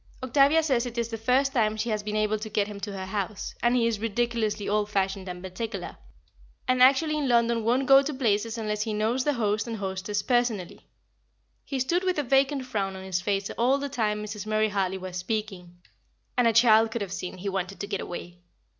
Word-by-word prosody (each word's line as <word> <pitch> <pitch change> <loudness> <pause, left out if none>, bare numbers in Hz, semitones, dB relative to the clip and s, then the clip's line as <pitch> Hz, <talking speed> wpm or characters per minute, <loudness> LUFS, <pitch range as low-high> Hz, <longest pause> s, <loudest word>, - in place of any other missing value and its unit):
Octavia 280 +5 +4
says 255 -5 +1
it 240 0 -8
is 235 -1 -1
the 230 - -4
first 255 +5 +1
time 220 -3 +1
she 230 +2 -1
has 215 -1 -1
been 210 0 -4
able 215 0 +1
to 215 +1 -6
get 210 -1 +1
him 205 -1 -8
to 200 +1 -5
her 190 -1 -5
house, 200 +1 -4
as 240 - +3
he 240 -2 +3
is 230 -3 0
ridiculously 225 -1 -1
old 210 0 0
fashioned 195 -1 -1
and 180 0 -7
particular, 190 +1 -5 0.7
and 255 0 +2
actually 280 +4 +5
in 290 -3 -1
London 235 -1 +3
won't 250 +4 +2
go 270 +1 +7
to 285 +2 -3
places 230 -4 0
unless 210 -1 -2
he 215 0 -2
knows 225 +5 0
the 295 - +2
host 215 -2 0
and 230 -1 -4
hostess 195 +1 -3
personally. 240 -7 -1 0.8
He 270 - -4
stood 340 +8 +1
with 370 -2 0
a 295 - +1
vacant 270 +1 +2
frown 200 -6 -2
on 190 - -8
his 185 -1 -2
face 195 0 -1
all 255 +4 +3
the 280 0 -4
time 210 -5 -1
Mrs. 210 0 -6
Murray 215 0 +2
Hartley 190 -2 -1
was 185 -1 -6
speaking, 185 -3 -4 0.6
and 245 -1 +3
a - - +5
child 225 -1 +5
could 225 0 -4
have 190 -2 -6
seen 185 -1 -5
he 190 +3 -6
wanted 190 0 -3
to - - -3
get 200 -1 -3
away. 175 0 -7
215 Hz, 220 wpm, -27 LUFS, 200-245 Hz, 0.8 s, go